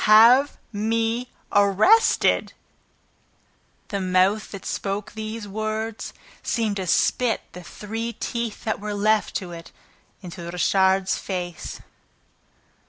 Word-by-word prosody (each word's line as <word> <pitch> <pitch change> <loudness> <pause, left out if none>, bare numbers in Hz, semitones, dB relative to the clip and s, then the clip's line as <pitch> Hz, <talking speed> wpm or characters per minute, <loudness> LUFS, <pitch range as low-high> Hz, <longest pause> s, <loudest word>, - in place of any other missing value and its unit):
"HAVE 235 +6 +7 0.2
ME 225 +3 0 0.2
ARRESTED!" 205 - +4 1.4
The 200 -1 -2
mouth 185 +3 +2
that 200 -2 -9
spoke 200 +1 -3
those 220 0 -6
words 215 +2 -3 0.3
seemed 220 -4 -1
to 190 -2 -3
spit 235 +6 +2
the 180 - -9
three 225 +6 -5
teeth 235 0 -4
that 220 - -1
were 210 0 -4
left 215 +1 +1
to 180 -2 -3
it 165 -1 -10 0.5
into 175 0 -8
Richard's 190 +2 +2
face. 180 -3 -5
210 Hz, 105 wpm, -24 LUFS, 190-225 Hz, 1.4 s, HAVE